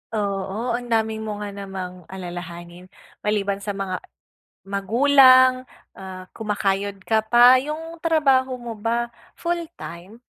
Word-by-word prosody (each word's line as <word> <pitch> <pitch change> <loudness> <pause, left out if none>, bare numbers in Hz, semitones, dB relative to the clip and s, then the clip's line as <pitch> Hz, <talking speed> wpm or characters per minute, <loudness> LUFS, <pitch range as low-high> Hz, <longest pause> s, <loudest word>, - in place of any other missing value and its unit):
Oo, 200 +3 -2
ang 240 +1 -3
dami 220 -1 0
mo 215 -1 -4
nga 205 - -5
namang 190 -3 -7
alalahanin, 175 -1 -8 0.3
maliban 200 -1 -1
sa 200 0 -4
mga 190 -2 -3 0.6
magulang, 255 +5 +5 0.3
ah, 185 -1 -9
kumakayod 200 -2 -1
ka 220 +2 +1
pa 245 +3 +7
yung 310 +5 -5
trabaho 275 -6 +2
mo 240 -3 -7
ba 235 +2 -1 0.2
full-time? 315 - -6
215 Hz, 115 wpm, -23 LUFS, 195-255 Hz, 0.6 s, pa